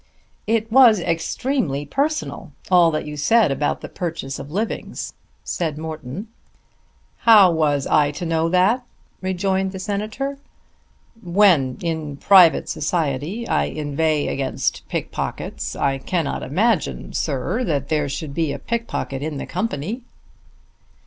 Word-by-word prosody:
"It 225 0 0
was 240 -4 +7
extremely 165 - -1
personal, 295 - -2 0.2
all 175 -2 +6
that 155 -2 -2
you 150 0 -6
said 195 +5 +3
about 140 +2 -1
the - - -6
purchase 165 -6 -5
of 140 +1 -8
livings," 210 +8 -4 0.3
said 160 -4 -2
Morton. 160 - -6 0.9
"How 210 -6 +7
was 150 -4 +1
I 150 -1 +3
to 175 +4 -5
know 165 0 +1
that?" 190 +8 +3 0.4
rejoined 190 +1 0
the - - -5
Senator. 215 +8 -3 0.8
"When 175 -8 +3
in 160 -4 -3
private 180 -1 +6
society 165 - -2
I 75 - +2
inveigh 150 - -1
against 135 -1 -2
pickpockets - - -4
I 135 -1 0
cannot 165 +2 -2
imagine, 195 - 0
sir, 155 - -1
that 140 - -1
there 150 -2 0
should 140 +1 -5
be 160 -1 0
a - - -3
pickpocket 230 - -3
in 150 0 -3
the - - -4
company." 195 - -3
165 Hz, 130 wpm, -21 LUFS, 145-205 Hz, 0.9 s, was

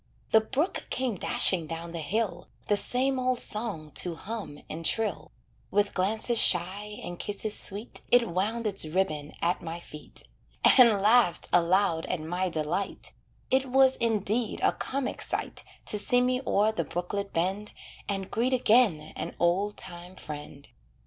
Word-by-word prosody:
The 220 - +6
brook 285 - -2
came 255 -3 -1
dashing 175 -2 +3
down 165 +1 -6
the 170 - -5
hill, 180 +2 -2 0.2
The 205 - +4
same 260 +5 0
old 255 0 +1
song 210 -11 +1
to 175 +2 -2
hum 205 -4 -7
and 165 +2 -7
trill; 220 +5 0 0.4
With 205 0 +1
glances 220 +5 +1
shy 195 +4 +2
and 175 0 -7
kisses 205 +1 0
sweet, 205 +4 -1
It 245 -1 +4
wound 210 +7 -2
its 200 -2 +1
ribbon 155 -3 -2
at 175 +1 0
my 165 0 -6
feet, 150 -3 -11 0.4
And 230 -6 +6
laughed 220 -4 +3
aloud 175 -1 +2
at 180 - -2
my 175 +4 -2
delight 165 +4 -3 0.4
It 265 +1 +2
was 265 0 +5
indeed 225 0 0
a - - +4
comic 270 -1 -4
sight - - -3 0.2
To 210 - +2
see 245 +4 +2
me 250 +1 +1
o'er 210 +2 +3
the 220 - -2
brooklet 200 +3 -4
bend, 190 +5 -1 0.4
And 195 -1 -3
greet 245 +4 0
again 215 -11 +3
an - - -6
old 190 +4 +1
time 175 0 -6
friend. 145 -3 -9
200 Hz, 155 wpm, -28 LUFS, 175-230 Hz, 0.4 s, The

